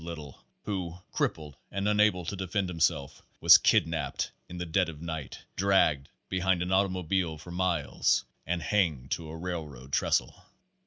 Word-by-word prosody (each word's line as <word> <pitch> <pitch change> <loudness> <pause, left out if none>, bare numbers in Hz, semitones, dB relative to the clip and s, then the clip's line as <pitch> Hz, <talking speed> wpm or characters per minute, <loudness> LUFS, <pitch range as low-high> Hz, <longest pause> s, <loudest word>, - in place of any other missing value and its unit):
Little, 80 -5 -8 0.2
who, 90 -4 -3
crippled 75 -3 -2
and 100 +1 -2
un 105 0 +2
able 95 -5 +3
to 100 - -3
defend 95 0 -2
himself, 80 -4 0 0.2
was - - +9
kidnapped 80 -4 +1 0.2
in 90 - -7
the 90 - -3
dead 80 0 +1
of* 75 -2 -9
night, 80 -5 -5 0.2
dragged 90 -8 +3 0.2
behind 95 -1 +1
an 90 - -4
automoblie 95 -3 +1
for 85 +3 -10
miles 90 -8 +1 0.2
and 85 -1 -2
hanged 80 -11 0
to 80 -2 -2
a 80 - -7
railroad 80 -7 -6
trestle. - - +1
85 Hz, 155 wpm, -29 LUFS, 80-95 Hz, 0.2 s, was